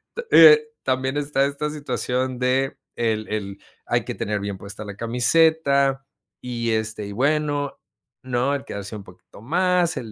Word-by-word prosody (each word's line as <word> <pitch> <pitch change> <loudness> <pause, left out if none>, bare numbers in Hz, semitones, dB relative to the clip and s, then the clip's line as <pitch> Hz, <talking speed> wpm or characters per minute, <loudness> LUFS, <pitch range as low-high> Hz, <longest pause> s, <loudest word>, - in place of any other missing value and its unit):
t 480 - -4
eh, 150 -2 +8 0.2
también 130 +1 -1
está 140 -1 +1
esta 145 +2 -3
situación 130 -3 -2
de, 130 +2 0 0.2
el 110 -2 -1
el 100 -2 -4 0.3
hay - - 0
que - - -5
tener 105 0 -2
bien 100 -1 -4
puesta 100 +2 -8
la 100 -1 -8
camiseta 140 +3 +2 0.4
y, 115 -2 -3
este, 110 -1 -2
y 100 - -7
bueno, 145 +2 0 0.4
¿no? 130 +2 0
El 140 - -6
quedarse 100 +1 -6
un 100 - -8
poquito 90 +2 -16
más, 175 +5 +1
el 110 -3 -6
130 Hz, 160 wpm, -23 LUFS, 110-145 Hz, 0.4 s, eh